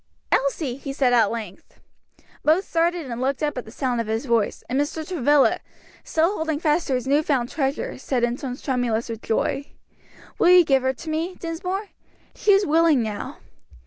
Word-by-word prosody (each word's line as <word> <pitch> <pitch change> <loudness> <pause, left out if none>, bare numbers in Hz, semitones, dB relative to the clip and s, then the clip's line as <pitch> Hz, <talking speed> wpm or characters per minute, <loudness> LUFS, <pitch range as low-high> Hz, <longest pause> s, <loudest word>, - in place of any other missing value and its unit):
"Elsie!" 275 -2 0
he 275 0 -6
said 260 -3 +2
at 225 -4 +4
length. 215 -5 -8 0.6
Both 325 +6 +3
started 340 0 0
and 235 +1 -4
looked 275 +3 -1
up 295 -1 0
at 250 - -5
the 220 - -11
sound 245 -1 -1
of 225 - -6
his 225 +4 -2
voice, 230 -4 0
and 265 +3 +1
Mr. 310 +2 -4
Travilla, 295 -5 +3 0.4
still 330 +5 +1
holding 315 -2 -1
fast 320 +1 +1
to 265 - +1
his 250 - -2
new 285 +3 +3
found 265 -6 0
treasure, 270 -3 -2
said 260 -2 -1
in 240 0 +1
tones 255 -1 -6
tremulous 245 -4 -1
with 225 -1 -5
joy, 275 +5 -1 0.7
"Will 350 - +5
you 360 -1 +8
give 270 -2 +3
her 260 +1 +1
to 315 +5 -9
me, 330 +4 -2
Dinsmore? 365 +5 -4 0.4
she 415 - +2
is 395 0 +5
willing 315 -4 +4
now." 215 -2 -5
275 Hz, 190 wpm, -23 LUFS, 245-320 Hz, 0.7 s, you